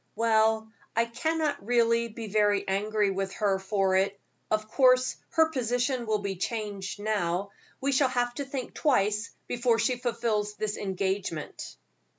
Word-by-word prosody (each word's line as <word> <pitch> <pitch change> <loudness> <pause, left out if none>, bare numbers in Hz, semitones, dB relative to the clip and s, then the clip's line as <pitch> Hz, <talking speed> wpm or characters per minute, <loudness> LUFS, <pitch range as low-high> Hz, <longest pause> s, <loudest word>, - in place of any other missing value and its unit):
"Well, 220 -1 +2 0.2
I 230 +1 +3
cannot 305 +2 -1
really 235 +1 +3
be 230 0 -7
very 205 -1 +2
angry 205 +1 +1
with 195 0 -3
her 200 -3 +1
for 195 -1 +1
it; 195 +1 0 0.3
of 215 0 0
course 255 +1 +4 0.2
her 320 0 +4
position 245 -1 0
will 215 -1 +2
be 200 -2 -4
changed 205 -1 -4
now. 200 -2 -1 0.3
We 275 +1 0
shall 270 0 +3
have 245 -1 0
to 280 +3 -4
think 270 -2 -5
twice 215 -7 +1 0.2
before 240 -1 +1
she 235 +2 +1
fulfills 230 -4 -1
this 215 0 -2
engagement." 190 -4 -3
220 Hz, 150 wpm, -28 LUFS, 200-245 Hz, 0.3 s, course